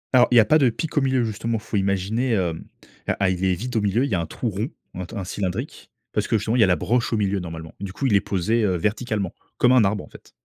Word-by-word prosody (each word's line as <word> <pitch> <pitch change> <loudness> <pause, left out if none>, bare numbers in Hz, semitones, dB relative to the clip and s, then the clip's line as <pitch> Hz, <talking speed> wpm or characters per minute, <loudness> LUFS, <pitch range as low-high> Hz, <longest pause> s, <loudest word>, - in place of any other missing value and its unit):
Alors, 125 - +7
il 125 - +2
y 115 - +9
a 110 - +6
pas 155 +7 +4
de 130 - +4
pic 160 +7 -5
au 145 - +4
milieu 130 -2 +2
justement, 115 +1 -2
faut 110 0 -6
imaginer, 100 +5 0
hem, 85 -5 -1 0.6
ah 100 -2 +3
il 90 +1 -3
est 95 -1 +2
vide 125 +6 -5
au 110 - +2
milieu, 105 +6 +1
il 140 - -4
y - - +2
a 85 - 0
un 80 - -4
trou 120 - -4
rond, 105 +6 -3 0.2
ou 90 - -5
un 90 - -4
t - - -10
un 95 - -3
cylindrique, 90 0 -4 0.2
parce - - 0
que 110 - +2
justement, 110 +3 -1
il - - +2
y - - +7
a 95 - +5
la 90 - +4
broche 115 +10 0
au 110 - +2
milieu 100 -1 0
normalement. 80 -2 -7
Du 95 -1 -6
coup, 135 - -3
il 105 -6 +3
est 100 - +4
posé, 105 +5 0
heu, 95 -3 +2
verticalement, 105 0 -1 0.2
comme 125 - +4
un 125 -4 +6
arbre, 100 0 0
en - - -13
fait. - - -16
105 Hz, 305 wpm, -23 LUFS, 95-120 Hz, 0.6 s, y